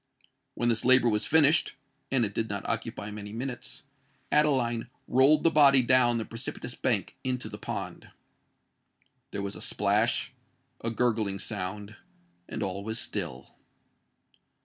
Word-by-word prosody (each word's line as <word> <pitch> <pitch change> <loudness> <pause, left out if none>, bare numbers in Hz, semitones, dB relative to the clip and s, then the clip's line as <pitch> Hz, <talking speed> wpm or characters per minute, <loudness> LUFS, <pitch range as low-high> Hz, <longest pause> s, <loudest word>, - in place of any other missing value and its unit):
When 120 - +1
this 115 -2 0
labour 130 -1 +6
was 105 -1 0
finished,—and 145 -4 +1
it 105 - -5
did 110 +2 -2
not 100 -1 -4
occupy 105 - -3
many 105 -1 -7
minutes,—Adeline 130 0 -2 0.2
rolled 140 +4 +4
the 165 - +4
body 140 -3 +6
down 120 -1 +4
the 110 - -3
precipitous 120 +1 -6
bank 115 -5 -1
into 125 -3 -2
the 105 -1 -9
pond. - - -6 1.2
There 100 - -4
was 100 0 -4
a - - -9
splash—a 125 +4 -2
gurgling 110 -4 0
sound; 105 +3 -5 0.5
and - - -3
all 100 +1 -3
was 110 +2 -4
still. 65 - -5
120 Hz, 125 wpm, -28 LUFS, 105-130 Hz, 1.2 s, labour